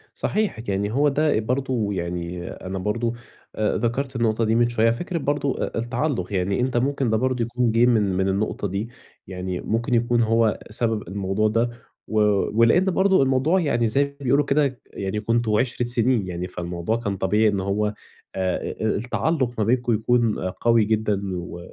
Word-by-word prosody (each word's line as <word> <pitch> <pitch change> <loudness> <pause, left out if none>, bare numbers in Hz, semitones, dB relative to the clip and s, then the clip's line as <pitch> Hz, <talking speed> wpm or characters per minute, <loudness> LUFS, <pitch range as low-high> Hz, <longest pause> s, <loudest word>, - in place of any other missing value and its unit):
صحيح 215 - -1
يعني 100 +1 -1
هو 145 +5 +3
ده 150 0 +2
إ - - +2
برضه 125 -1 -1
يعني 85 0 -4
أنا 95 +1 -6
برضه 115 +4 -1 0.4
آآ 105 -1 0
ذَكَرت 130 +3 -2
النقطة 115 -1 +1
دي 110 0 +2
من 120 0 +3
شوية. 115 -1 +3
فكرة 170 +9 -3
برضه 145 -2 -1
أ - - -6
التعلُّق، 120 - -2
يعني 95 +2 0
أنت 125 0 0
ممكن 135 0 0
ده 110 - +2
برضه 130 +1 0
يكون 120 0 0
جه 115 +2 +4
من 120 -3 +4 0.2
من 95 0 +1
النقطة 100 +1 -1
دي، 100 +4 -3 0.4
يعني 90 -1 -4
ممكن 115 +3 -1
يكون 120 0 +2
هو 115 -1 +2
سبب 110 -2 -2
الموضوع 100 +2 0
ده. 115 +3 +1 0.4
و 110 - 0 0.4
ولإن 115 +11 +5
برضه 190 -1 +3
الموضوع 135 +7 +2
يعني 120 -9 +1
زي 135 +6 +2
ما 140 0 -6
بيقولوا 140 +2 +2
كده، 140 -3 +1
يعني 100 +2 -4
كنتم 115 0 +1
عِشرَة 120 +1 0
سنين 120 -3 +1
يعني، 90 0 -4
فالموضوع 90 +4 -3
كان 100 -4 -3
طبيعي 105 +4 +2
إن 100 -1 -1
هو 100 +2 0 0.5
آآ 95 -1 0
إ - - -11
التعلُّق 130 +4 0
ما 110 - +1
بينكم 120 +2 +1
يكون 115 0 +1
قوي 115 +4 +2
جدًا، 105 -2 0
و 85 0 -6
115 Hz, 180 wpm, -23 LUFS, 100-125 Hz, 0.5 s, ولإن